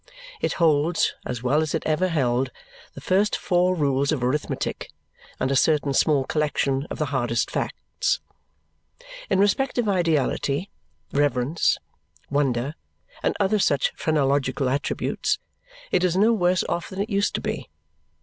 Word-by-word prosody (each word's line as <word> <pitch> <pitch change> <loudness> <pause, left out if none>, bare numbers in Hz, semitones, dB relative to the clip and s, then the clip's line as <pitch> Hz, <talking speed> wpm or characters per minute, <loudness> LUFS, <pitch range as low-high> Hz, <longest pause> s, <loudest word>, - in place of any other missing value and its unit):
It - - 0
holds, 160 0 +2
as 125 -1 -4
well 140 +5 +3
as 155 0 -1
it 160 - -3
ever 160 +4 +2
held, 130 -6 +1 0.5
the - - -8
first 200 +3 +2
four 180 0 +2
rules 140 -2 +1
of 140 -6 -1
arithmetic 135 +4 -2 0.5
and 130 - 0
a - - +2
certain 145 0 +2
small 145 0 +3
collection 140 -1 0
of - - -5
the 155 - 0
hardest 120 -3 0
facts. - - -2 1.1
In - - +2
respect 205 +8 +2
of 240 -3 +1
ideality, 165 -2 0 0.4
reverence, 145 +2 +1 0.5
wonder, 135 -1 0 0.5
and - - 0
other 205 +1 +2
such 140 -7 +2
phrenological 140 -3 +1
attributes, 140 +2 -1 0.5
it 185 - +2
is 180 0 +2
no 220 +4 +5
worse 180 -4 +2
off 170 - -2
than 190 - -7
it 210 +3 -2
used 200 0 +1
to - - -2
be. - - -4
150 Hz, 145 wpm, -24 LUFS, 135-185 Hz, 1.1 s, no